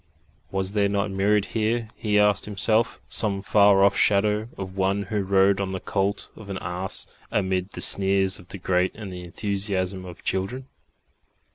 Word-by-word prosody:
Was 95 0 -2
there 100 -1 +1
not 100 0 -1
mirrored 100 +2 +1
here, 115 +1 -2
he 105 -2 -1
asked 105 -1 +3
himself, 110 +3 0
some 100 -3 +2
far 100 -1 +4
off 100 0 +4
shadow 105 +2 +2
of 95 -1 -7
One 100 +1 0
Who 105 +1 -2
rode 95 0 +2
on 95 -1 -3
the 95 - -3
colt 100 +1 -2
of 105 -2 -12
an 95 - -4
ass 90 +2 -1 0.2
amid 95 -1 -2
the - - -6
sneers 95 0 +5
of 90 - -15
the 100 - -8
great 90 0 0
and 105 -4 -8
the 90 - -8
enthusiasm 95 0 -3
of 90 -1 -11
children?... 100 +8 -2
100 Hz, 170 wpm, -24 LUFS, 95-105 Hz, 0.2 s, sneers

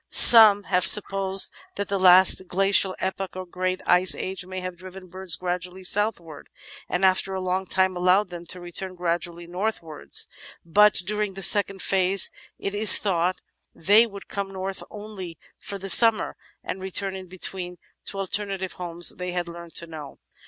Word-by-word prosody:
Some 215 -3 +7
have 180 -2 +1
supposed 195 -1 +3 0.2
that 200 - -5
the 200 -1 -3
last 185 0 +5
Glacial 195 0 +2
Epoch, 190 0 -5
or 185 0 -7
Great 185 +1 -4
Ice 180 +1 +3
Age, 190 0 -6
may 185 0 -7
have 185 -1 -7
driven 185 +1 -12
birds 185 -2 -4
gradually 180 +1 -6
southwards, 180 -6 -2 0.4
and 180 +2 0
after 190 +1 0
a - - -4
long 185 +1 -3
time 190 0 0
allowed 185 +3 +1
them 175 -1 -10
to 180 - -8
return 185 +2 -7
gradually 175 0 -4
northwards: 175 -3 -3 0.4
but 210 +5 +3
during 210 -1 -3
the 195 - -5
second 195 0 +3
phase, 190 0 +2 0.3
it 200 - -6
is 210 0 +8
thought, 185 -2 -1 0.4
they 205 +7 +3
'would 200 -2 -12
come 200 -1 -5
north 190 0 -7
only 205 -6 -10 0.2
for 200 - -7
the 195 - -11
simimer 225 +2 +5 0.3
and 185 - -7
return 190 +1 -3
in 190 -1 -10
between 180 0 -8 0.3
to - - -5
the - - -9
alternative 195 -1 -5
home 175 -1 -9 0.2
they 180 -1 -6
had 175 -1 -4
learnt 170 0 -12
to 170 - -5
know. 155 -4 -11
185 Hz, 170 wpm, -23 LUFS, 180-195 Hz, 0.4 s, is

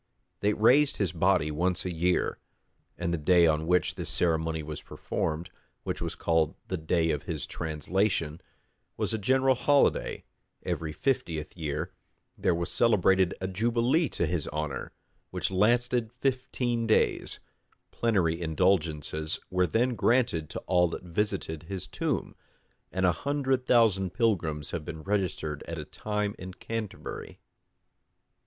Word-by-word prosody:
They 105 +1 +2
raised 135 +8 +4
his 95 -6 0
body 85 -2 +2
once 90 +4 0
a 90 - -2
year; 90 +2 +1 0.6
and 85 - -1
the 85 - -1
day 85 +3 +5
on 80 0 +2
which 90 -1 +2
this - - -5
ceremony 80 -2 +1
was 75 -1 -6
performed, 80 +2 -3 0.3
which - - -3
was - - -3
called 80 -2 +1
the 95 - -1
day 80 +1 +1
of 75 -2 -1
his 80 -3 -2
translation, 80 +1 -1 0.6
was - - -1
a 110 - -1
general 130 +5 +3
holiday: 140 +3 +2 0.4
every 80 -2 -2
fiftieth 80 - -2
year 75 -4 -3 0.4
there 85 - +1
was 85 0 -3
celebrated 95 -5 +3
a 95 - -2
jubilee 120 - +2
to - - 0
his 85 -4 -1
honor, 75 -3 -4 0.4
which - - -2
lasted 120 +4 +2
fifteen 125 -2 -1
days: 110 - +1 0.5
plenary 90 -8 +1
indulgences 80 -3 0
were 90 -1 +2
then 120 +9 +1
granted 115 - +2
to - - -5
all 90 -1 +4
that 85 - -6
visited 90 -3 -2
his 95 -3 -4
tomb; - - -2 0.6
and 95 0 +1
a 90 - +5
hundred 135 - -1
thousand 95 -6 +3
pilgrims 85 -11 0
have 85 - -3
been 80 0 -7
registered 90 -7 -1
at 85 - -4
a 75 - -5
time 105 +2 -2
in 90 0 -8
Canterbury. 115 -1 -6
90 Hz, 140 wpm, -28 LUFS, 80-115 Hz, 0.6 s, day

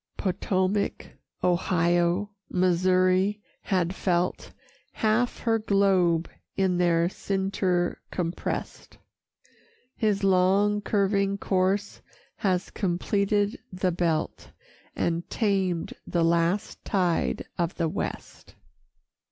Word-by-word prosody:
Potowmak, 190 +1 -1 0.3
Ohio, 175 +2 +1 0.2
Missouri 185 +2 +2 0.2
had 180 -2 0
felt 180 -1 -1 0.4
Half 225 +3 0
her 225 -1 +1
globe 190 -5 +2 0.3
in 185 -2 +1
their 170 -1 +3
cincture 190 -2 -1
comprest; 170 -1 -4 1.0
His 210 -3 0
long 195 +2 +3
curving 200 -1 +1
course 195 +1 0 0.4
has 185 -4 0
completed 200 +2 0
the 185 0 0
belt, 165 -2 -1 0.5
And 170 0 -1
tamed 190 -6 0
the 170 -1 +1
last 170 +5 0
tide 180 -5 0
of 170 0 0
the 165 - 0
west. - - -6
185 Hz, 85 wpm, -26 LUFS, 175-200 Hz, 1.0 s, their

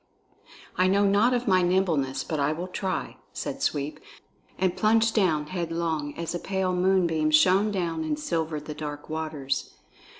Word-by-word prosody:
"I 185 - +4
know 200 +2 +3
not 205 +5 +4
of 245 -1 -1
my 185 -2 +4
nimbleness, 170 -8 +1
but 155 - -3
I 140 +2 +1
will 170 +3 -4
try," 185 0 -3 0.2
said - - -5
Sweep, 145 +1 -1 0.6
and 185 -1 +1
plunged 220 +3 +3
down 165 -8 +2
headlong, 165 -3 -3
as 170 0 -3
a 175 - -2
pale 190 -1 -1
moonbeam 180 -4 +2
shone 185 +7 +4
down 170 -5 -2
and 155 -1 -1
silvered 155 -1 -2
the 150 - -5
dark 150 0 -7
waters. 155 -4 -3
170 Hz, 160 wpm, -26 LUFS, 155-190 Hz, 0.6 s, I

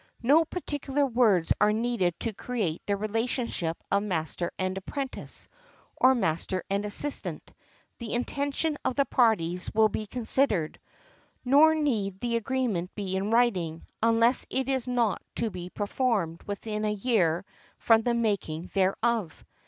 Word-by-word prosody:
No 300 +7 +5
particular 290 -4 -2
words 225 -9 +3
are 210 0 +5
needed 215 -6 0
to 230 - -2
create 205 -8 -3
the 200 -1 +1
relationship 215 -5 -1
of 200 +1 +3
master 175 -3 -2
and 185 0 -1
apprentice, 265 +8 -5 0.5
or 260 +1 +5
master 185 -3 -1
and 200 +1 0
assistant, 270 +8 -1 0.5
the 235 -2 -5
intention 285 +4 -1
of 255 - -1
the 280 - +3
parties 180 -10 +1
will 220 0 +5
be 215 +1 -4
considered, 220 - 0 0.7
nor 300 +5 +6
need 215 -11 -1
the 235 +1 -1
agreement 230 -7 -1
be 195 -3 -3
in 195 +2 -1
writing, 190 -9 +1 0.2
unless 230 +2 +4
it 265 -1 -1
is 265 -2 -1
not 240 -4 +1
to 230 -2 0
be 180 -1 -7
performed 205 -5 -1
within 210 +1 -4
a 210 - +1
year 195 -6 +1 0.3
from 225 -1 +4
the 235 +1 0
making 200 -7 -2
thereof. 195 0 0
220 Hz, 140 wpm, -27 LUFS, 190-250 Hz, 0.7 s, nor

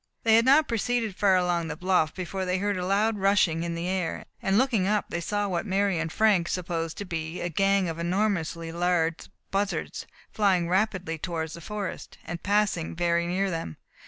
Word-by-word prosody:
They 225 - +4
had 230 +1 +5
not 285 +4 +5
proceeded 230 -2 -1
far 195 -1 +4
along 175 -2 +1
the - - -4
bluff 180 -3 +2
before 190 +1 -4
they 180 0 0
heard 205 +1 0
a 180 - -3
loud 210 +2 +1
rushing 190 -4 +3
in 170 0 -3
the 170 +1 -3
air, 185 -3 -2 0.2
and 195 +1 +2
looking 230 -7 +2
up 210 0 0
they 170 - -2
saw 205 +3 -1
what 175 -3 -1
Mary 195 -2 +1
and 165 0 -2
Frank 205 -5 +3
supposed 165 -2 -3
to 205 - -5
be 165 -1 -4
a 175 - -2
gang 195 +2 +2
of 165 0 -4
enormously 170 -2 -1
large 170 -1 0 0.2
buzzards, 200 +1 -2 0.2
flying 190 -5 +2
rapidly 185 -3 0
towards 160 -2 -3
the 170 - -9
forest, 205 +2 -6
and 170 -1 -5
passing 200 -6 0
very 170 0 +1
near 190 +2 0
them. 165 - -4
185 Hz, 190 wpm, -27 LUFS, 170-200 Hz, 0.2 s, had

